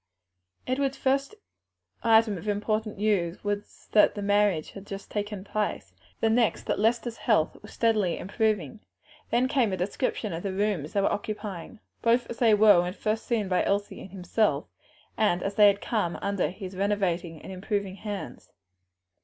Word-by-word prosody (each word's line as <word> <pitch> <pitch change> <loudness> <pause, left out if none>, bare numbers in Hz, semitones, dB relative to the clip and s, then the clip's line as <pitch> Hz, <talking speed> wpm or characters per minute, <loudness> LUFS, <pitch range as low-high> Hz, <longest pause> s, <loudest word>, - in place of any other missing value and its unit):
Edward's 270 +1 -1
first 275 +8 0 0.7
item 225 -2 +4
of 210 +4 -1
news 195 -5 0
was 205 0 -4
that 210 - +5
the 205 - -4
marriage 205 -5 +2
had 200 0 -11
just 195 0 -8
taken 205 -2 -3
place; 205 - -3 0.3
the - - +3
next 230 0 +2
that - - -1
Lester's 230 +2 +1
health - - +2
was - - -12
steadily 215 -6 +1
improving. 210 - -1 0.5
Then 245 +2 +2
came 260 -6 +2
a 185 - -1
description 205 +2 -2
of 165 - -4
the 195 0 -3
rooms 190 -6 -1
they 200 - +2
were - - +2
occupying; 210 0 -5 0.2
both 235 +1 +2
as 235 - -7
they 225 -3 +5
were 210 -4 +7
when 180 +1 -3
first 215 +2 -2
seen 220 -5 0
by 180 -1 +2
Elsie 200 +1 -1
and - - -9
himself 180 -4 0 0.5
and 195 -5 +2
as 195 - -2
they 210 0 +7
had 200 0 +3
become 205 -7 -1
under 200 -6 0
his 190 +1 -8
renovating 185 -4 -1
and - - -10
improving 195 +1 -3
hands. 200 - -7
205 Hz, 165 wpm, -27 LUFS, 190-220 Hz, 0.7 s, were